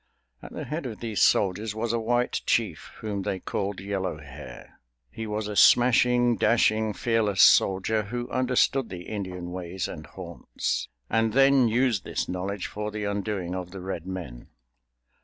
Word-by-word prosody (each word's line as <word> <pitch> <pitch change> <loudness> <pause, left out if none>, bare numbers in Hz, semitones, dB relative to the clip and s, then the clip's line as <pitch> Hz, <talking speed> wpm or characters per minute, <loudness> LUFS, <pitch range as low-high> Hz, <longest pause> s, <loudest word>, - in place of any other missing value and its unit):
At - - -11
the - - -5
head 150 -2 -4
of 110 -3 -7
these 110 -3 -2
soldiers 100 +2 +2
was 115 +1 -1
a 115 - +1
white 120 +2 0
chief, - - 0
whom 105 -2 -3
they 95 0 -2
called 100 +1 -3
Yellow 95 -4 -3
Hair. 70 -4 -12 0.3
He 110 - -6
was 105 0 -3
a 105 - -5
smashing, 120 +1 +5
dashing, 110 0 +2
fearless 110 -5 +2
soldier 95 +3 +4
who 120 +3 -4
understood 130 +1 +1
the 90 -1 -7
Indian 90 -4 -5
ways 90 0 -4
and - - -8
haunts, - - -4 0.2
and 115 -1 +1
then 135 -1 +5
used 115 -3 +1
this - - -3
knowledge 95 +2 -3
for 105 0 -4
the 105 0 -5
undoing 100 -3 -2
of 90 -1 -5
the 95 +1 -8
Red 90 -2 -5
Men. 85 -11 -7
105 Hz, 160 wpm, -26 LUFS, 95-115 Hz, 0.3 s, smashing